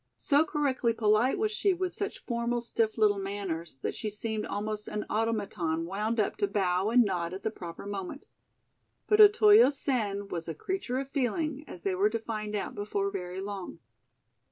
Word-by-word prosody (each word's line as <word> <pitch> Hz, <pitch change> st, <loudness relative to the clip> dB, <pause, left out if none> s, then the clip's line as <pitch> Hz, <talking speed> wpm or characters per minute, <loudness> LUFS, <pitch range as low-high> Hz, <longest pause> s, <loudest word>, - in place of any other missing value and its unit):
So 285 Hz, +2 st, +3 dB
correctly 275 Hz, -6 st, 0 dB
polite 215 Hz, +3 st, +3 dB
was 430 Hz, 0 st, 0 dB
she 400 Hz, -3 st, +1 dB
with 365 Hz, 0 st, -2 dB
such 415 Hz, +5 st, -5 dB
formal, 235 Hz, 0 st, -1 dB
stiff 225 Hz, -2 st, 0 dB
little 210 Hz, -2 st, +3 dB
manners 195 Hz, -6 st, -4 dB
that -, -, -1 dB
she 215 Hz, -, -4 dB
seemed 215 Hz, +1 st, -3 dB
almost 210 Hz, 0 st, -4 dB
an 210 Hz, -, -3 dB
automaton 200 Hz, -7 st, -1 dB
wound 210 Hz, +5 st, -2 dB
up 210 Hz, -, 0 dB
to 205 Hz, -, +1 dB
bow 190 Hz, -1 st, +1 dB
and 240 Hz, 0 st, +5 dB
nod 180 Hz, -2 st, -2 dB
at 190 Hz, -, -9 dB
the 220 Hz, -, -1 dB
proper 175 Hz, -3 st, -8 dB
moment. 200 Hz, +6 st, -5 dB, 0.8 s
But 425 Hz, 0 st, +5 dB
Otoyo 425 Hz, 0 st, +8 dB
Sen 215 Hz, -8 st, -2 dB
was 170 Hz, -3 st, -5 dB
a 165 Hz, -, -4 dB
creature 320 Hz, -, -3 dB
of 270 Hz, 0 st, -4 dB
feeling, 290 Hz, +2 st, -1 dB
as 175 Hz, -, -10 dB
they 195 Hz, -, 0 dB
were 195 Hz, +3 st, +3 dB
to 230 Hz, -, -1 dB
find 215 Hz, -2 st, -4 dB
out 205 Hz, -, -3 dB
before 205 Hz, -1 st, -2 dB
very 185 Hz, -1 st, -5 dB
long. 195 Hz, -3 st, -6 dB
215 Hz, 180 wpm, -29 LUFS, 195-255 Hz, 0.8 s, Otoyo